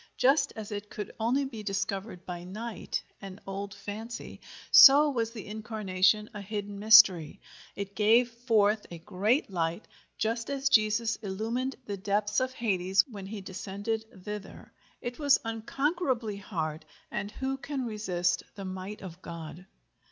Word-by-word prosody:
Just 280 +2 +3
as 215 -1 -7
it 205 0 -5
could 210 - -6
only 250 +5 +1
be 235 -5 -7
discovered 195 -1 -3
by 175 -1 -6
night—an 195 -1 -6
old 195 +1 -5
fancy—so 240 +6 +4
was 230 -4 -1
the 225 -3 -9
Incarnation 210 -1 +1
a 205 - -6
hidden 205 0 -5
mystery; 205 -7 +7 0.4
it 200 0 -6
gave 230 +3 +4
forth 220 -3 +2
a 170 - -7
great 205 - 0
light, 170 +2 -2 0.3
just 230 +3 -1
as 275 0 0
Jesus 215 +1 +3
illumined 225 +6 -3
the 200 -1 -4
depths 205 +2 0
of 255 0 -1
Hades 195 -6 +2
when 200 -5 -8
he 205 0 -6
descended 200 +4 -4 0.2
thither; 210 -2 -8 0.3
it 240 +3 -5
was 285 -2 +5
unconquerably 240 - -1
hard, 160 -6 -4 0.3
and 205 - -3
who 265 0 -2
can 270 -1 -4
resist 180 -6 0
the 200 -1 -7
might 190 +2 -6
of 180 -1 -9
God? 170 +2 -8
210 Hz, 140 wpm, -29 LUFS, 195-230 Hz, 0.4 s, mystery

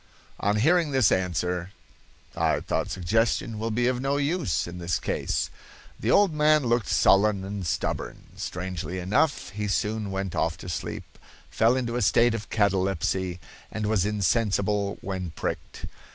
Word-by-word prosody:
On 105 +1 +1
hearing 160 +8 +3
this 130 -5 +3
answer 90 -1 0 0.7
I - - +1
thought - - -1
suggestion 110 +4 0
will 115 +1 -2
be 120 +2 0
of 125 0 +1
no 135 +1 0
use 145 - 0
in 85 +1 -8
this 85 -1 0
case. - - -2 0.5
The - - -2
old 200 -5 +5
man 150 -1 +4
looked 120 -3 +1
sullen 100 0 +4
and 100 -2 -4
stubborn. - - -3
Strangely 90 -1 -4
enough, 135 - +1
he 105 +1 -3
soon 105 +1 -1
went 95 -1 -3
off 80 0 0
to 90 - -8
sleep, 85 - -6 0.3
fell 115 +3 +3
into 120 -2 -2
a - - -1
state 120 0 +4
of 115 -2 -5
catalepsy, 95 -3 0 0.3
and 110 -1 -3
was 105 -3 +2
insensible 105 0 +1
when 95 -4 -4
pricked. - - -4
105 Hz, 150 wpm, -26 LUFS, 95-120 Hz, 0.7 s, old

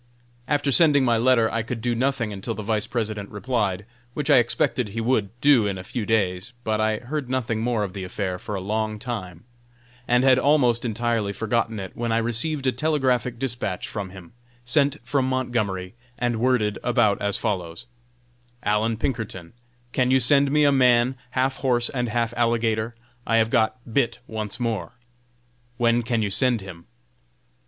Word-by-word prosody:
After 145 -1 +1
sending 145 -3 +5
my 120 -2 +3
letter, 120 -1 +4
I 115 - 0
could 115 +2 -5
do 120 +1 0
nothing 120 -3 0
until 100 +4 -4
the 110 - -6
Vice 105 0 -1
President 110 -4 -3
replied, 105 -3 -2 0.3
which 145 -2 0
I - - +7
expected 120 0 0
he 110 +3 -5
would 115 -3 +1
do 135 -7 +5
in 100 -1 -2
a 90 - -7
few 110 +2 -4
days; 100 0 0
but 110 -1 0
I 110 0 +1
heard 130 +3 -5
nothing 120 -4 -1
more 115 -2 0
of 95 -3 -4
the 95 - -5
affair 90 0 -3
for 105 - -5
a 95 - -3
long 110 +2 -2
time, 95 -8 -6 0.6
and 125 +1 +3
had 130 -1 +5
almost 125 -5 +3
entirely 115 -2 0
forgotten 110 +2 -1
it, 95 -1 -7
when 120 -1 -2
I 115 - +2
received 120 +6 -1
a 130 - +3
telegraphic 130 -3 0
dispatch 115 -7 -3
from 100 -3 -5
him, 90 -3 -12 0.3
sent 140 +2 +2
from 135 0 +1
Montgomery, 110 -8 -2 0.2
and 120 -1 0
worded 115 -3 +1
about 115 -4 +2
as 100 0 +1
follows: 95 -1 -3 0.8
"ALLAN 110 +2 +1
PINKERTON: 110 -9 -4 0.4
Can 125 0 +1
you 130 0 +5
send 140 +1 +4
me 150 0 +4
a 145 - +5
man 125 -1 +4
half 130 +1 0
horse 120 -3 +1
and 125 -3 -2
half 115 0 -1
alligator? 115 -1 0 0.3
I 115 - +2
have 110 0 +2
got 115 -1 +2 0.2
'bit' 120 -3 +1
once 110 -1 -5
more! 110 -8 -2 0.8
When 120 0 +3
can 115 -1 0
you 100 - -2
send 125 +2 +2
him?" 90 -3 -11
115 Hz, 175 wpm, -24 LUFS, 105-125 Hz, 0.8 s, I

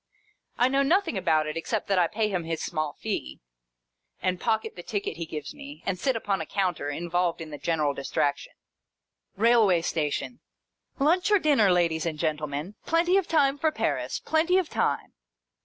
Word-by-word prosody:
I 245 - +4
know 275 +1 +2
nothing 335 - +2
about 155 -5 +2
it, 155 - -4
except 200 +6 -2
that 195 -2 +2
I 175 - +4
pay 215 +4 0
him 185 -4 -2
his 165 -1 -3
small 155 -3 -2
fee, 65 - -4 0.8
and 185 -1 -1
pocket 240 - 0
the - - -7
ticket 410 0 -3
he 165 - -5
gives 155 - -6
me, 290 0 -11
and 185 -2 -1
sit 265 +6 +1
upon 200 -3 -1
a - - -4
counter, 180 -7 -1
involved 175 +3 -1
in 160 -1 -7
the 145 - -7
general 150 -2 0
distraction. 140 +1 -2 0.8
Railway 215 -5 +4
station. 160 +10 -2 0.3
" - - -39
Lunch 340 +8 +3
or 415 - +6
dinner, 280 - +4
ladies 170 -2 +1
and 160 -2 -3
gentlemen. 150 +2 -2
Plenty 340 +3 +2
of 390 -3 +2
time 285 -3 +2
for 315 +1 +2
Paris. - - -1
Plenty 325 +4 +2
of 370 -4 0
time - - -1
195 Hz, 180 wpm, -27 LUFS, -, 0.8 s, or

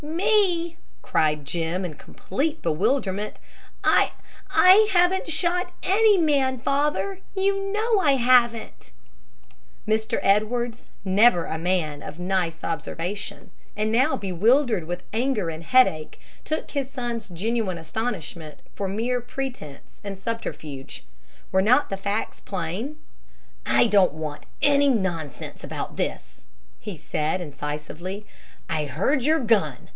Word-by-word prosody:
"Me!" 345 0 +1 0.3
cried 150 -2 +1
Jim, 170 +4 -2
in 170 - -5
complete 300 - -3
bewilderment. 200 - 0 0.5
"I - - +4 0.4
I 390 +4 +7
haven't 360 +1 +3
shot 355 +2 0
any 420 +1 +5
man, 280 -6 +2
father! 295 - 0 0.2
You 390 0 0
know 435 +1 +2
I 300 -7 +4
haven't." 240 - +2 1.0
Mr. 220 0 +1
Edwards, 230 +4 +1 0.2
never 195 -1 +5
a 160 - -4
man 165 -4 -1
of 155 - -8
nice 180 -2 -1
observation, 170 +4 -4 0.3
and 215 +1 0
now 260 +3 +3
bewildered 215 - +2
with 175 +2 -5
anger 225 -6 0
and 160 +1 -8
headache, 165 -9 +3 0.2
took 310 - -3
his 275 -2 -2
son's 240 -5 -4
genuine 195 +1 -1
astonishment 165 -3 -5
for 200 - -3
mere 235 +6 -1
pretense 245 - -7
and 200 -1 -5
subterfuge. 160 -10 -6 0.5
Were 190 - +4
not 255 +7 +4
the 195 - -2
facts 200 +2 -3
plain? 195 - -4 0.7
"I - - +5
don't 200 -8 +4
want 155 -2 -6 0.2
any 285 0 +5
nonsense 170 - -2
about - - -5
this," - - -4 0.4
he 205 -5 -7
said 155 +3 -1
incisively. 155 +5 -6 0.4
"I 160 -4 -1
heard 195 - 0
your 315 +4 +3
gun. 205 - +1
215 Hz, 120 wpm, -24 LUFS, 170-275 Hz, 1.0 s, I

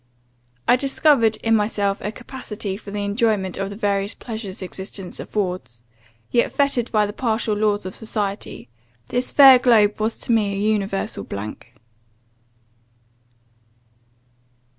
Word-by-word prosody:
I 250 - +6
discovered 270 -4 +3
in 225 0 +3
myself 205 -2 0
a 210 - -3
capacity 220 -5 -6
for 205 0 -10
the 205 0 -3
enjoyment 205 -3 0
of 195 0 -2
the 200 - -7
various 200 -1 -1
pleasures 220 -5 -7
existence 190 0 -7
affords; 180 - -4 0.5
yet, 240 - +2
fettered 280 -4 0
by 215 -2 +3
the 205 - -5
partial 225 -2 -1
laws 205 -1 0
of 185 - -5
society, 205 - -4 0.4
this 245 +1 -1
fair 270 -3 +9
globe 215 -5 +4
was 220 +1 -1
to - - -2
me 210 -3 +2
an - - -3
universal 200 - -1
blank. 100 +2 -7
210 Hz, 130 wpm, -22 LUFS, 195-230 Hz, 0.5 s, fair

